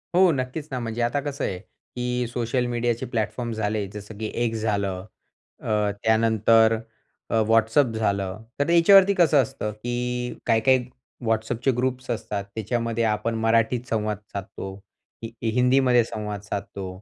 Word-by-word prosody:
हो, 185 -1 +6
नक्कीच 135 +3 -3
ना. 130 - -2
म्हणजे 115 0 -3
आता 120 +5 +1
कसं 140 0 -4
आहे, 90 - -2
की 125 +3 -5
सोशल 120 +1 -1
मीडियाचे 120 -1 -1
प्लॅटफॉर्म 110 +2 -2
झाले, 105 -1 -1
जसं 105 0 -9
की 110 0 -4 0.2
X 115 - -5
झालं, 100 -3 -1 0.6
अ, 105 -1 0
त्यानंतर 110 0 +4 0.5
अ, 115 - +2
WhatsApp 115 +3 +3
झालं. 100 -2 -1 0.2
तर 145 - +1
याच्यावरती 195 +3 +7
कसं 155 -5 +5
असतं, 105 -2 -4
की 125 +2 -3
काही-काही 125 +2 +3 0.4
WhatsAppचे 115 +3 0
ग्रुप्स 130 0 -2
असतात, 110 -3 -3
त्याच्यामध्ये 115 +1 -1
आपण 115 +2 -2
मराठीत 115 +2 +2
संवाद 105 -2 -1
साधतो, 95 0 -6 0.5
हि 115 - -5 0.2
हिंदीमध्ये 125 -1 +4
संवाद 105 -2 -5
साधतो 100 -2 -5
115 Hz, 140 wpm, -24 LUFS, 110-125 Hz, 0.6 s, याच्यावरती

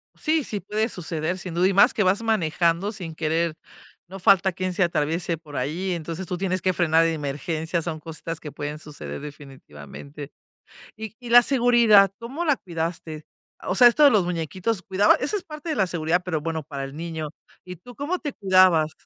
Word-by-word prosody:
Sí, 315 -1 0
sí 210 -4 -4
puede 215 +4 -2
suceder, 165 0 -3
sin 180 -2 -7
duda, 180 +2 +3
y 195 - +1
más 240 +7 +5
que 210 - +1
vas 190 +4 +2
manejando 175 -2 +1
sin 180 -7 -6
querer, 160 +1 -1 0.5
no 190 +2 -9
falta 190 +1 +4
quién 185 +1 -3
se 185 - +2
atraviese 165 +1 -1
por 150 -3 -13
ahí, 165 +9 -2
entonces 170 +2 -5
tú 180 +1 -4
tienes 185 -1 -2
que 185 -1 +1
frenar 165 -1 +3
de 165 0 +1
emergencia, 160 +3 -3
son 160 -1 -5
cositas 160 +1 -7
que 150 - -8
pueden 150 +1 -6
suceder 75 - -8
definitivamente, 140 - -11 0.7
y 220 0 -7
y 240 -1 -9
la 245 +1 +8
seguridad, 235 -7 +5
¿cómo 265 +9 -5
la 295 -4 +2
cuidaste? 165 -2 -5 0.4
O 185 - -1
sea, 245 - +8
esto 270 +6 +4
de 285 - +9
los 205 -7 +2
muñequitos, 180 +5 -2
¿cuidaba? 195 +2 +3
Eso 295 +11 -2
es 375 - -7
parte 305 +1 -8
de 310 - -1
la 190 - +1
seguridad, 170 +1 0
pero 160 -4 -2
bueno, 160 -1 -3
para 140 -2 -6
el 135 +2 -8
niño. 160 -2 -5 0.3
¿Y 180 -1 -9
tú 245 +7 -14
cómo 320 +6 -3
te 290 -4 -5
cuidabas? 185 -6 +4
175 Hz, 200 wpm, -24 LUFS, 160-205 Hz, 0.7 s, de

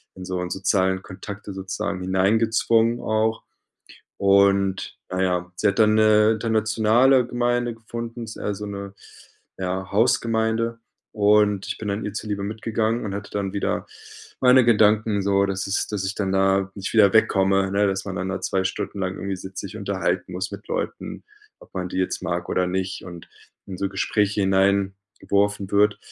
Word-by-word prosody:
in 95 - -9
so 90 -1 -3
sozialen 95 0 +1
Kontakte 100 +2 -8
sozusagen 95 -1 -4
hineingezwungen 110 +5 +2
auch. 110 +1 0 0.8
Und, 100 -1 +2
na 95 0 -1
ja, 90 -1 -1
sie 105 - +2
hat 100 - -1
dann 110 0 +5
'ne 110 0 +5
internationale 110 +3 +3
Gemeinde 120 -1 0
gefunden, 115 +1 -7
ist 110 - -9
eher 105 - -3
so 105 - -7
'ne 100 -1 -7 0.6
ja, 95 0 -3
Hausgemeinde 115 0 +1 0.3
und 105 -1 +3
ich - - -3
bin 105 - -5
dann 100 +2 -2
ihr 105 - -5
zuliebe 105 -2 -3
mitgegangen 110 +2 -1
und 100 - -4
hatte 100 +1 -6
dann 100 -2 -2
wieder 100 - -2 0.5
meine 125 0 +6
Gedanken 110 -2 +3
so, 100 0 +2
dass 95 0 -3
es 100 - -1
dass 100 -3 -3
ich 100 - -3
dann 95 -2 -2
da 95 0 +2
nicht 95 -2 -5
wieder 100 -4 +6
wegkomme, 95 -3 +3
ne? 100 +1 +3
Dass 95 0 -2
man 95 -1 -4
dann 95 +1 -3
da 95 - -3
2 95 -1 -1
Stunden 100 +1 -3
lang 95 0 -2
irgendwie 100 -1 -4
sitzt, 95 +1 -8
sich 100 +2 -8
unterhalten 95 -3 -2
muss 95 +3 -3
mit - - -9
Leuten, - - -4 0.4
ob - - -18
man 90 -1 -3
die - - -3
jetzt 95 - -1
mag 85 0 -3
oder 90 0 +1
nicht 95 +1 -3
und 85 -2 -10 0.4
in 95 - -7
so 100 - -1
Gespräche 105 +1 0
hineingeworfen 100 +1 0
wird. 105 0 +3
100 Hz, 170 wpm, -23 LUFS, 95-110 Hz, 0.8 s, meine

